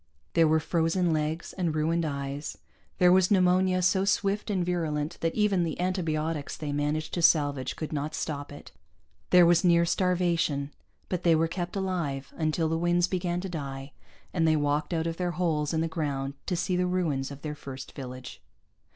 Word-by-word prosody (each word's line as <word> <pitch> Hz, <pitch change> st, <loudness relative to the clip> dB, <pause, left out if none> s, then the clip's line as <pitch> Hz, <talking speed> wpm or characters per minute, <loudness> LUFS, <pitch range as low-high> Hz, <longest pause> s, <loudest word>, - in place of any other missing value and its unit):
There 165 Hz, -1 st, +5 dB
were 160 Hz, +1 st, +3 dB
frozen 165 Hz, +2 st, +1 dB
legs 155 Hz, +2 st, -2 dB
and 170 Hz, -5 st, -1 dB
ruined 165 Hz, +2 st, +1 dB
eyes; 140 Hz, 0 st, -4 dB, 0.4 s
there 180 Hz, 0 st, +5 dB
was 185 Hz, 0 st, +5 dB
pneumonia 185 Hz, -1 st, +3 dB
so 190 Hz, +1 st, +3 dB
swift 200 Hz, +1 st, 0 dB
and 185 Hz, -4 st, 0 dB
virulent 160 Hz, -2 st, -2 dB
that 165 Hz, 0 st, 0 dB
even 205 Hz, -4 st, +2 dB
the 165 Hz, -1 st, -3 dB
antibiotics 165 Hz, -4 st, -2 dB
they 150 Hz, -2 st, -4 dB
managed 150 Hz, +2 st, -1 dB
to 175 Hz, -, -1 dB
salvage 145 Hz, -5 st, +2 dB
could 155 Hz, 0 st, -5 dB
not 150 Hz, +1 st, -3 dB
stop 145 Hz, -2 st, -4 dB
it; 145 Hz, -, -11 dB, 0.6 s
there 180 Hz, -1 st, +7 dB
was 170 Hz, +1 st, +4 dB
near 170 Hz, -1 st, +5 dB
starvation 170 Hz, -5 st, +1 dB, 0.4 s
but 180 Hz, -2 st, -2 dB
they 170 Hz, -2 st, +4 dB
were 165 Hz, +1 st, +2 dB
kept 175 Hz, +2 st, -4 dB
alive, 170 Hz, -8 st, -2 dB
until 160 Hz, 0 st, 0 dB
the 165 Hz, +1 st, -1 dB
winds 175 Hz, +1 st, +3 dB
began 175 Hz, -1 st, -1 dB
to 190 Hz, -, -4 dB
die, 140 Hz, -4 st, -6 dB, 0.4 s
and 165 Hz, -3 st, +2 dB
they 155 Hz, -, +4 dB
walked 145 Hz, +1 st, 0 dB
out 165 Hz, -1 st, 0 dB
of 165 Hz, 0 st, -3 dB
their 180 Hz, -1 st, -1 dB
holes 155 Hz, -5 st, 0 dB
in 160 Hz, -, 0 dB
the 165 Hz, -, 0 dB
ground 140 Hz, -4 st, -3 dB
to 180 Hz, -, 0 dB
see 180 Hz, +1 st, -1 dB
the 180 Hz, 0 st, +1 dB
ruins 160 Hz, -7 st, -1 dB
of 140 Hz, 0 st, -10 dB
their 150 Hz, -1 st, -3 dB
first 135 Hz, -3 st, -9 dB
village. 130 Hz, -2 st, -8 dB
165 Hz, 185 wpm, -28 LUFS, 150-180 Hz, 0.6 s, there